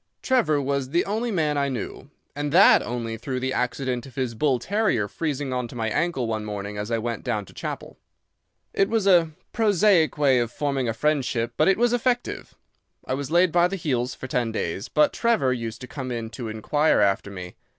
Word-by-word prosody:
Trevor 230 - +2
was 140 -1 -1
the 170 +5 +1
only 220 +4 -1
man 155 -7 0
I 140 0 0
knew, 130 +2 -6 0.3
and 145 0 -2
that 185 +6 +7
only 115 -2 -4
through 130 +3 -4
the 130 +1 -2
accident 125 0 -2
of 130 - -15
his 130 -3 -2
bull 135 +2 +1
terrier 185 - 0
freezing 145 +1 -3
on 125 -1 -2
to 115 - -12
my 110 -2 -1
ankle 165 -5 0
one 110 -1 -2
morning 105 -1 -5
as 105 +1 -4
I 115 - +1
went 115 0 -3
down 110 -5 -2
to - - -16
chapel. - - -6 0.7
"It 195 - +2
was 225 -3 +1
a 175 -4 +5 0.2
prosaic 205 -7 +3
way 135 -4 +4
of 120 -1 -1
forming 135 -4 -1
a - - 0
friendship, 125 -4 0
but 155 - +3
it 195 - +4
was 240 +1 +2
effective. 245 0 -1 0.5
I - - -2
was 135 0 -3
laid 175 +1 +4
by 175 +1 +4
the 195 - -4
heels 130 -8 -1
for - - -8
ten 125 -3 -1
days, 100 -2 -3
but 150 - +3
Trevor 190 - +2
used 115 -1 -5
to 125 - -7
come 130 -2 -6
in 115 -2 -4
to 115 +1 -6
inquire 145 +8 +1
after 100 -1 +2
me. 90 -2 -8
130 Hz, 210 wpm, -24 LUFS, 115-165 Hz, 0.7 s, that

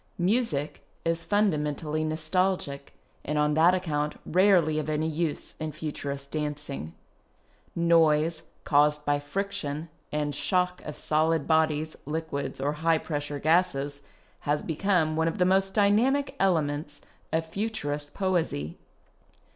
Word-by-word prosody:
Music 180 - 0 0.2
is 165 0 0
fundamentally 155 -5 0
nostalgic, 155 -2 -1 0.3
and 150 +1 -2
on 150 0 +2
that 165 +4 +5
account 150 -5 -2
rarely 175 -4 +4
of 155 0 -3
any 155 +1 0
use 160 -1 -2
in 155 0 -3
Futurist 140 -2 -5
dancing. 150 - -4 0.8
Noise, 165 -1 +3 0.2
caused 150 0 +3
by 145 0 +2
friction 165 -1 -3 0.2
and 150 -1 -1
shock 180 +4 0
of 150 - -6
solid 155 0 +1
bodies, 155 -1 +1
liquids, 155 -3 -3
or 140 +2 0
high 165 0 +4
pressure 145 -2 -4
gases, 145 -3 +1 0.4
has 145 +1 -1
become 160 -1 +1
one 160 +1 +1
of 165 - -2
the 180 - +3
most 190 +1 +2
dynamic 230 +8 +3
elements 150 -5 0 0.3
of 160 0 0
Futurist 160 -6 -3
poesy. 170 - -1
155 Hz, 125 wpm, -27 LUFS, 150-180 Hz, 0.8 s, that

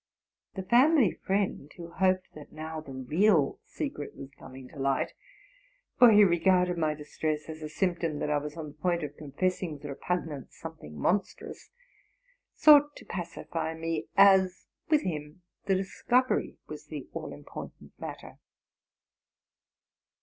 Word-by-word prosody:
The 190 - -4
family 250 - +5
friend, 190 -7 -2
who 170 -1 -9
hoped 185 +1 +1
that 150 -1 -12
now 155 0 -6
the 140 - -11
real 150 +4 +2
secret 275 - -5
was 135 0 -10
coming 130 -1 -12
to 145 - -12
light 135 0 0 0.9
(for 245 - +9
he 210 -1 +8
regarded 180 0 +3
my 155 -2 0
distress 155 +1 -3
as 160 0 -8
a 155 - -5
symptom 170 -2 -1
that 150 - -2
L 145 - +2
was 150 +2 -7
on 155 -2 -5
the - - -13
point 170 +2 -1
of 145 0 -5
confessing 165 +4 -2
with 145 - -12
repug 155 +5 -2
nance 145 -4 -9
something 75 0 -9
monstrous), 195 - -2 0.9
sought 295 -1 +7
to - - -12
pacify 165 -2 -4
me; 165 -1 -3
as 190 -2 +5 0.2
with 305 -1 +4
him 155 +1 -5 0.2
the 195 - +3
discovery 245 +7 0
was - - -9
the - - -7
all - - -5
important - - -10
matter. - - -8
170 Hz, 145 wpm, -29 LUFS, 150-190 Hz, 0.9 s, for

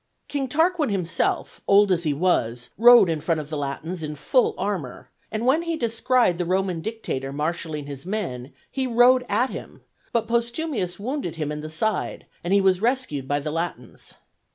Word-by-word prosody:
King 280 -2 -2
Tarquin 320 +2 +2
himself, 180 -4 -1
old 200 0 +5
as 170 -2 +1
he 150 - +2
was, 125 -7 0
rode 240 -2 +8
in 160 -2 -1
front 165 0 0
of 150 0 -8
the - - -2
Latins 150 +5 -4
in 150 -1 -4
full 445 - +2
armor; 180 -12 -4 0.2
and 220 +2 -2
when 275 +6 +4
he 335 -1 -2
descried 230 - +2
the - - +1
Roman 185 -1 0
dictator 160 -11 -4
marshalling 150 0 -3
his 140 -2 -7
men, 170 - -4 0.2
he 265 -1 -1
rode 250 +1 +5
at 235 +6 +1
him; - - -9 0.3
but 230 -2 0
Postumius 235 - -1
wounded 250 - -3
him 150 -2 -3
in 150 - -4
the 155 - -6
side, 195 +6 -1 0.2
and 175 - -3
he 200 0 +5
was 190 -1 +3
rescued 230 - 0
by 145 +1 +1
the 150 +1 -4
Latins. 165 +2 -5
185 Hz, 180 wpm, -24 LUFS, 155-240 Hz, 0.3 s, rode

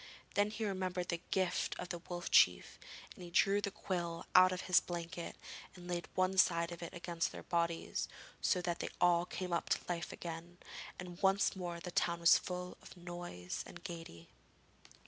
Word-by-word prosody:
Then 205 +1 +3
he 220 +1 -3
remembered 185 -2 -2
the 170 -1 -1
gift 185 -2 0
of 180 - -5
the 175 - -3
Wolf 175 0 -5
Chief, - - +5 0.3
and 185 - -11
he 175 - -7
drew 195 +3 +4
the 200 - -1
quill 175 -3 -3
out 185 0 +8
of 185 0 -2
his 180 - +5
blanket 170 -1 -5 0.4
and 175 -1 -11
laid 175 -1 -2
one 185 +1 +2
side 170 -1 +4
of 170 - -7
it 170 - -5
against 170 -1 -1
their - - -8
bodies, 170 -1 0 0.3
so 180 -2 +2
that 175 -1 -1
they - - -2
all 175 0 +4
came 180 0 -4
to 170 - +1
life 175 -1 -2
again, 170 +1 -7 0.4
and 180 0 -8
once 195 +1 +3
more 175 -2 -4
the 180 +1 -6
town 170 0 +1
was 170 0 +8
full 180 0 -5
of - - -13
noise 175 - -5
and - - -11
gaiety. 165 - -8
175 Hz, 185 wpm, -36 LUFS, 170-185 Hz, 0.4 s, out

